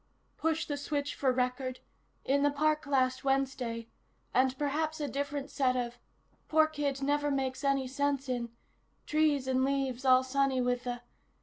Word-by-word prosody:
"... - - -41
push 325 +1 0
the 290 -2 -3
switch 285 0 -2
for 265 -2 +1
record... 255 0 -1 0.5
in 280 +1 +2
the 290 - +4
park 305 +1 +1
last 260 -2 +1
Wednesday... 265 -4 -1 0.5
and 260 +1 +3
perhaps 310 +2 -1
a 295 - -1
different 285 0 -3
set 260 -3 +2
of... 245 -1 -3 0.5
poor 315 0 +5
kid 290 -3 -2
never 290 +1 +1
makes 270 -1 -1
any 275 -1 +1
sense 280 +1 -1
in... 245 -2 -2 0.6
trees 300 -3 +2
and 260 0 +2
leaves 270 -2 0
all 255 -1 +6
sunny 270 0 +1
with 245 0 0
the 245 -1 -3
275 Hz, 165 wpm, -31 LUFS, 255-285 Hz, 0.6 s, all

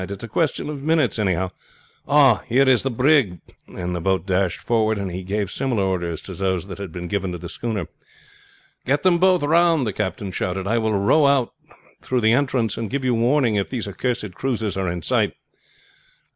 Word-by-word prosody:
"It's 100 +2 -6
a - - -5
question 150 +8 -1
of 150 -2 -5
minutes, 155 -6 +1
anyhow. 95 -2 0 0.6
Ah, 140 -6 +5
here 130 +3 +3
is 130 -2 +4
the 135 - -1
brig!" 125 - +2 0.3
and 90 0 -5
the 85 - -3
boat 95 -1 0
dashed 95 -2 0
forward 110 -2 +1
and 100 -2 -3
he 90 +2 -5
gave 100 +1 -2
similar 125 -7 -1
orders 85 -4 -2
to 95 - -8
those 95 -1 -1
that 95 0 -9
had 100 -4 -6
been 90 +1 -6
given 95 -1 -2
to - - -4
the 85 - -8
schooner. 105 +1 -4 1.0
"Get 140 +2 0
them 180 -2 +4
both 185 -2 +3
round!" 165 -1 +3
the 105 - -2
captain 100 0 -3
shouted. 95 +1 -3
"I 115 +3 +1
will 110 -1 0
row 120 +10 +4
out 135 -4 +2 0.5
through 125 -1 -1
the 110 +1 +4
entrance 125 -5 0
and 115 -2 -3
give 135 -1 -2
you 125 - +2
warning 120 -1 +2
if 100 - -1
these 120 -5 -4
accursed 110 -1 -3
cruisers 110 -4 -2
are 95 -2 -1
in 85 -1 -4
sight." - - +1
110 Hz, 200 wpm, -22 LUFS, 95-130 Hz, 1.0 s, Ah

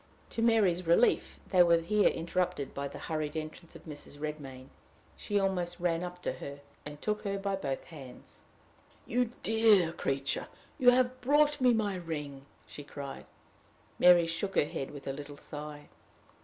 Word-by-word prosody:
To 230 - -2
Mary's 200 -7 +3
relief 170 +8 +3
they 185 -2 +5
were 170 -1 +6
here 205 +5 +2
interrupted 175 -3 -2
by 140 0 -3
the - - -9
hurried 155 -1 -3
entrance 155 +2 -7
of - - -12
Mrs. 145 -2 -7
Redmain. 145 -4 -6 0.5
She 205 -1 -1
almost 185 -3 -1
ran 170 -1 0
up 180 0 -7
to - - 0
her, 140 0 -8 0.3
and 150 0 -9
took 210 +4 -1
her 200 -1 -2
by 195 0 -1
both 135 -8 -3
hands. 140 -6 -13 0.6
"You 245 +2 +1 0.2
dear 215 -6 +4
creature! 135 -2 -1 0.3
You 250 - +7
have 255 0 +2
brought 295 +2 +3
me 250 -1 +6
my 215 -3 +1
ring!" 150 -5 -6 0.2
she 145 - -9
cried. 140 -1 -8 0.7
Mary 175 -1 +7
shook 180 +4 -3
her - - +4
head 135 -2 -5
with 145 -2 -10
a 135 - -2
little 145 +1 -8
sigh. 150 0 -8
170 Hz, 165 wpm, -31 LUFS, 145-200 Hz, 0.7 s, You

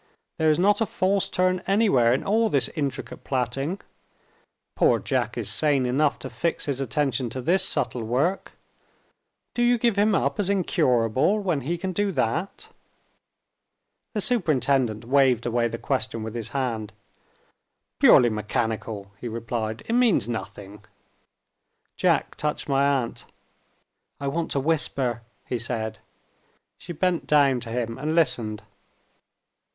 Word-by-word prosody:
"There 160 0 +3
is 155 - +3
not 205 +4 +3
a 225 - +2
false 190 +1 0
turn 185 0 +1
anywhere 195 - +3
in 130 - +1
all 220 +2 +2
this 140 -7 +1
intricate 140 -4 -4
plaiting. 135 +7 -2 1.0
Poor - - +4
Jack - - -2
is - - -3
sane 145 -4 +2
enough 140 +4 +1
to - - -7
fix 170 -1 -2
his 140 -2 -2
attention 130 -1 -1
to 130 - -5
this 175 +8 +2
subtle 125 -9 0
work. 135 - -1 1.0
Do 240 - -2
you 240 0 +4
give 230 -3 +1
him 205 0 +3
up 210 - 0
as 200 -2 0
incurable, 150 - +2
when 180 -9 -1
he 170 +7 -2
can 190 +2 -3
do 205 +2 0
that?" 160 - -2 1.5
The 210 - +1
superintendent 135 - +1
waved 130 -2 +3
away 120 0 +1
the 115 - -5
question 115 -3 -2
with 110 0 -6
his 115 -2 -4
hand. 115 -7 -3 1.1
"Purely 120 -2 +6
mechanical," 110 -1 -3
he 120 - -4
replied. 115 -1 -4
"It 230 - -1
means 240 - +3
nothing." 105 -3 -7 1.1
Jack - - +1
touched 150 0 -3
my 140 0 +2 0.2
aunt. 115 - -8 1.0
"I 140 - -4
want 165 +3 -2
to 140 - 0
whisper," 135 -5 0 0.2
he 125 - -3
said. 110 -2 -4 0.8
She 175 - -8
bent 175 +1 -1
down 140 -4 +4
to 120 - -9
him, 115 -1 -3
and 155 +2 -1
listened. 115 -9 0
135 Hz, 140 wpm, -25 LUFS, 115-175 Hz, 1.5 s, Purely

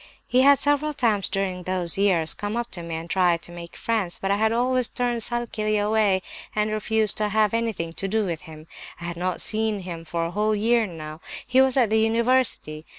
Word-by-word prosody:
He 255 - +3
had 280 +1 +6
several 290 +1 0
times 215 -6 +1
during 190 -2 -2
those 180 -2 +1
years 180 -6 +2
come 205 +2 -4
up 240 0 -4
to 175 - -4
me 170 -1 -5
and 165 +1 -6
tried 175 -2 +1
to - - -10
make 170 0 -10
friends; 215 -7 -2
but 195 - -2
I 200 - +2
had 220 +1 +2
always 250 +1 +1
turned 245 -2 -2
sulkily 220 -2 -1
away 205 -2 +1 0.3
and 210 0 0
refused 215 0 +3
to 210 -1 0
have 215 0 +2
anything 220 -8 -2
to 195 - -2
do 215 +2 0
with 170 -4 -4
him. 155 0 -11 0.3
I - - -9
had 170 0 -4
not 180 +1 -3
seen 215 -2 -1
him 170 -2 -7
for 165 +1 -3
a 165 - -4
whole 215 +2 0
year 225 +1 +2
now; 155 -2 -9 0.2
he 255 +1 +4
was 265 0 +2
at 235 -5 +3
the 220 - +3
university. 225 -8 +1
210 Hz, 215 wpm, -24 LUFS, 175-230 Hz, 0.3 s, had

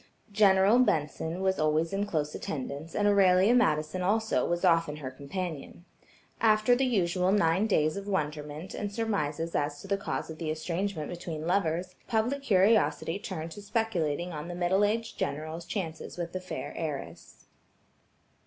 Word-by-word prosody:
General 200 +2 +5
Benson 160 - 0
was 190 0 +1
always 155 +3 +1
in 200 +1 0
close 150 -5 -1
attendance, 145 +3 -5
and 205 - +2
Aurelia 195 +1 +5
Madison 155 -7 +2
also, 220 +4 +1
was 175 0 0
often 165 -3 +3
her 140 -4 -6
companion. 160 +4 -6 0.5
After 215 +2 +4
the 260 +1 +1
usual 185 -5 +1
nine 190 +1 +3
days 155 -7 +2
of 200 0 -6
wonderment 150 -2 -3
and 205 -1 -4
surmises 170 -8 -2
as 145 0 -1
to 195 - -10
the 200 0 +1
cause 195 - -4
of 155 - -10
the 160 - -3
estrangement 165 +1 -2
between 165 -3 -5
lovers, 180 0 0
public 240 +5 0
curiosity 200 -5 +3
turned 165 -4 -5
to 205 - -9
speculating 180 -7 -1
on 150 +1 -5
the 175 - -5
middle 180 +3 +2
aged 225 +2 -1
general's 155 +3 -3
chances 170 -6 -5
with 170 -1 -4
the 185 - -3
fair 185 - -6
heiress. 150 -4 -6
180 Hz, 155 wpm, -29 LUFS, 155-205 Hz, 0.5 s, General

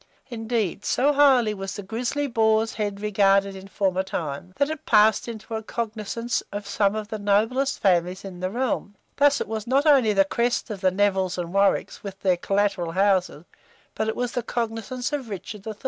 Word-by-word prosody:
Indeed, 225 -4 -2
so 285 +3 +2
highly 265 -6 +4
was 195 -2 -6
the 205 - -6
grizzly 245 +8 -2
boar's 225 -3 +2
head 205 -2 -3
regarded 200 -2 +2
in 190 0 -10
former 190 -2 0
times, 175 -2 -5
that 280 +2 +1
it 315 - -6
passed 215 0 +4
into 230 0 -7
a 220 - -2
cognizance 225 +1 -3
of 205 0 -5
some 200 0 +1
of 215 -1 -5
the 215 - -4
noblest 225 +7 +1
families 185 0 +1
in 185 -2 -8
the 185 +1 -2
realm: 230 -2 -2 0.2
thus 285 0 +4
it - - -3
was 220 +1 -4
not 275 +4 +2
only 270 -8 +5
the 195 -1 +4
crest 235 +3 -1
of 200 -3 -6
the 190 - +4
Nevills 190 -1 0
and 175 0 -4
Warwicks, 200 0 +1
with 195 -1 -8
their 185 -2 +2
collateral 195 -3 0
houses, 185 -4 +1 0.5
but 220 - -2
it 220 - -1
was 245 -1 -2
the 245 - -2
cognizance 240 +3 -3
of 270 -5 -3
Richard 200 +1 -7
III. 220 - -4
210 Hz, 195 wpm, -24 LUFS, 195-235 Hz, 0.5 s, only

